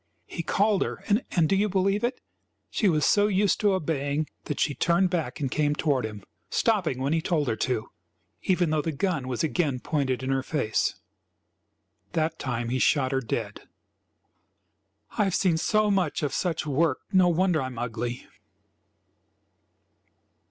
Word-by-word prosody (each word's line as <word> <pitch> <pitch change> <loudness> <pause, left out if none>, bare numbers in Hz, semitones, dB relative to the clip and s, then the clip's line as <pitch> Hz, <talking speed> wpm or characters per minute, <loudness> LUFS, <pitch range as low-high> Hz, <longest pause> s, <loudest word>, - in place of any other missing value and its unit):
He 170 - -5
called 200 +4 +1
her, - - -3
and 200 -6 +2
do 195 - +2
you 205 +2 +2
believe 195 +2 +1
it? 250 +2 -1 0.5
she 205 - +2
was 155 -4 +2
so 205 0 +4
used 200 0 +2
to 205 -2 +3
obeying 150 -3 -1 0.2
that 150 - -4
she 145 - +1
turned 175 +5 +2
back 170 -4 -2
and 135 -4 -2
came 150 -1 +1
toward 140 -7 0
him, 105 -2 -10 0.3
stopping 185 - +1
when 135 +3 0
he 165 - +1
told 160 -4 0
her 110 - +1
to, 125 -4 -2 0.5
even 180 -4 +1
though 155 -1 +2
the 160 - -2
gun 155 -3 -1
was 125 +2 -2
again 155 -5 0
pointed 130 -3 -1
in 130 - -1
her 135 0 +1
face. 130 -6 0 1.2
That 160 -1 -1
time 120 -3 -2
he 130 +1 0
shot 135 -1 +2
her 135 -1 +1
dead. 110 -3 -4 1.5
"I've 195 -3 +2
seen 175 -5 +2
so 215 +4 +2
much 185 -7 0
of 140 -2 -1
such 175 -4 -1
work 145 -1 +1
no 185 -2 +5
wonder 175 -2 +2
I 130 - -2
am 125 -2 -9
ugly!" 120 +1 -4
155 Hz, 165 wpm, -26 LUFS, 135-185 Hz, 1.5 s, no